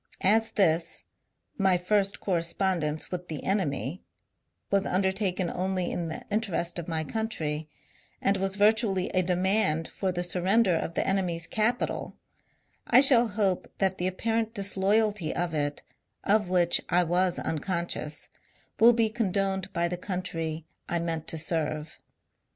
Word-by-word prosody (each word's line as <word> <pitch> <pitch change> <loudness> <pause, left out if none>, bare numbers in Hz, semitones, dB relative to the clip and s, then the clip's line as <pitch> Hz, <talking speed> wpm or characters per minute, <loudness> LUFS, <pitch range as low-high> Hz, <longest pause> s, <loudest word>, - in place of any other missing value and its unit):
As 220 +3 +3
this, 165 -4 +1 0.3
" - - -45
my 190 -2 +3
first 200 +2 0
correspondence 170 -3 -1
with 180 -1 -5
the 155 -3 -6
enemy," 180 -3 -1 0.7
was 200 -1 +2
undertaken 190 -1 0
only 185 0 -1
m 170 -1 -3
the 160 - -6
interest 185 -5 -1
of 170 - -7
my 160 -2 -1
country, 160 -7 -3 0.5
and 195 - +2
was 195 0 -1
virtually 205 -2 +2
a 185 - +2
demand 180 -2 +1
for 190 -2 -3
the 175 0 -2
sur 180 0 -1
render 195 +1 +3
of 165 0 -2
the - - 0
enemy's 180 -4 0
capital, 220 +6 -1 0.7
I 245 - +7
shall 255 -3 +8
hope 200 -3 -1
that 190 -1 0
the 180 - 0
apparent 225 +4 -1
disloyalty 200 -1 +1
of 175 -1 -1
it, 145 -1 -2 0.4
of 210 -2 +2
which 175 -2 +2
I 180 +1 +4
was 180 +1 +1
unconscious, 165 -2 -3 0.5
will 235 +2 +7
be 230 -1 +2
condoned 195 -3 -1
by 170 0 0
the 175 0 -4
countnr 165 -4 -4 0.3
I 175 - 0
meant 165 -2 -3
to 160 - -3
serve. 155 -1 -2
185 Hz, 145 wpm, -27 LUFS, 170-200 Hz, 0.7 s, shall